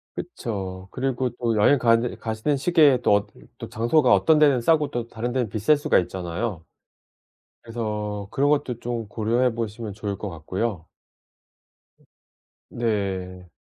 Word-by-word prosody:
그쵸. 95 - -6
그리고 130 -1 -1
또 115 -2 0
여행가는 115 +1 +3
가시는 110 +6 -1
시기에 150 -3 +4
또 - - +3
어디를 100 0 -2
또 - - -8
장소가 125 +4 +3
어떤 155 -1 +4
데는 140 -4 +5
싸고 150 +3 +2
또 120 -1 -3
다른 120 +2 -4
데는 125 -3 0
비쌀 110 +9 +2
수가 145 - +3
있잖아요. 90 0 -4 1.0
그래서 105 -3 -4
그런 140 +2 +1
것도 140 -5 0
좀 115 -3 -4
고려해 115 +3 +1
보시면 110 -2 -5
좋을 100 -1 -4
것 105 - -5
같고요. 90 +2 -4 1.9
으 - - -12
네. 95 -5 -2
115 Hz, 285 characters per minute, -24 LUFS, 100-125 Hz, 1.9 s, 데는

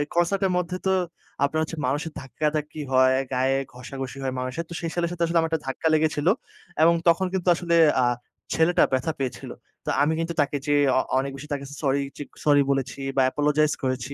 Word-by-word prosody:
Concert 175 +3 +2
এর 185 - -1
মধ্যে 180 +1 -2
তো 190 - +3 0.5
আপনার 155 +3 +1
হচ্ছে 160 0 -6
মানুষের 150 +4 -1
ধাক্কাধাক্কি 150 +3 -3
হয়, 130 0 +5 0.2
গায়ে 130 +1 +2 0.2
ঘষাঘষি 130 +1 -7
হয় 130 - -1
মানুষের। 130 +6 -3
তো 170 - -7
সেই 165 - -3
ছেলের 170 -1 0
সাথে 170 -1 -2
আসলে 170 0 +2
আমার 165 0 +1
একটা 160 - 0
ধাক্কা 145 +4 -1
লেগেছিল। 155 0 +1 0.5
এবং 170 +1 +6
তখন 170 +3 +4
কিন্তু 185 -1 -2
আসলে 170 0 0 0.3
আ - - +3 0.5
ছেলেটা 165 +2 +4
ব্যথা 130 +5 +1
পেয়েছিল। 130 -2 -4 0.4
তো - - -2
আমি 155 +2 +3
কিন্তু 165 +1 -2
তাকে 145 0 0
যেয়ে, 145 0 +4
অ - - +5 0.2
অনেক 135 +1 -2
বেশি 145 +2 -9
তাকে 140 -1 -4 0.2
সরি 140 -1 +1 0.2
চিক 145 - -6 0.2
সরি 145 -1 +5
বলেছি, 135 -1 -2 0.2
বা 135 - +4
অ্যাপোলোজাইজ 150 +2 +2
করেছি। 130 +1 -2
150 Hz, 195 wpm, -25 LUFS, 135-165 Hz, 0.5 s, এবং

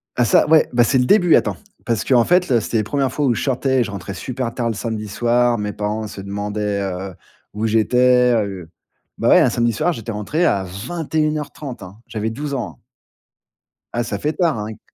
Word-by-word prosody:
Ah 120 - +2
ça, - - +4
ouais, 160 0 +5
ben 120 0 +5
c'est 130 +3 +2
le 125 - +2
début, 180 0 +5
attends, - - +1 0.3
parce 115 -2 0
qu'en 125 -3 +4
fait, 180 +1 +3
là 120 -3 +4
c'était 115 - -2
les 110 - +1
1res 135 +4 -1
fois 150 - -1
où 125 - +3
je - - -3
sortais 130 0 +1
et - - +3
je 110 - -6
rentrais 100 -1 -6
super 120 +5 -4
tard 120 -2 -2
le - - -1
samedi 110 -1 -4
soir. 120 +3 +1
Mes 105 -1 -3
parents 105 +1 -3
se 100 -1 -9
demandaient, 105 +1 -3
heu, 95 0 -4 0.4
où 110 +2 -1
j'étais, 125 +3 +3
heu. 100 -6 -3 0.5
Bah, - - +1
ouais, - - +7
un - - +4
samedi 120 0 +1
soir, 160 +10 0
j'étais 115 -4 -6
rentré 115 - -1
à 100 - +2
21:30 150 - -3
hein. 90 +2 -11
J'avais 110 0 -3
12 140 +5 -5
ans, 130 -3 -4
hein. - - -35 1.1
Ah 120 - 0
ça 105 -3 -4
fait 150 +8 -1
tard 170 -6 +1
hein 105 0 -4
et 110 -1 -9
115 Hz, 220 wpm, -20 LUFS, 105-135 Hz, 1.1 s, ouais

